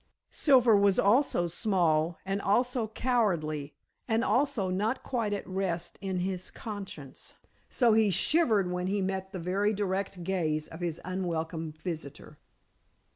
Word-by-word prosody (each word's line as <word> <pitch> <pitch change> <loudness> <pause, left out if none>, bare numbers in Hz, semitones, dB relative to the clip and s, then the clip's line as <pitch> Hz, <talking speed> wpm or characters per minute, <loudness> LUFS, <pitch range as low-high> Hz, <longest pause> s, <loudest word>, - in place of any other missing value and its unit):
Silver 250 -6 +5
was 200 -1 +4
also 205 -3 +3
small, 170 -3 +1
and 195 +1 -1
also 240 +3 +1
cowardly, 175 - -1 0.3
and 225 0 +1
also 245 -9 +1
not 210 +7 -1
quite 230 -5 -1
at 205 - -3
rest 185 -3 -3
in 190 -2 -2
his 185 0 -3
conscience, 190 - -8 0.3
so 240 -4 +3
he 220 -1 +4
shivered 205 - +2
when 180 0 -2
he 200 +2 0
met 190 0 -2
the 195 - -5
very 195 +5 0
direct 195 -2 -2
gaze 160 -4 -1
of 160 - -10
his 170 -2 -3
unwelcome 165 -3 -3
visitor. 155 -3 -7
190 Hz, 135 wpm, -29 LUFS, 170-215 Hz, 0.3 s, Silver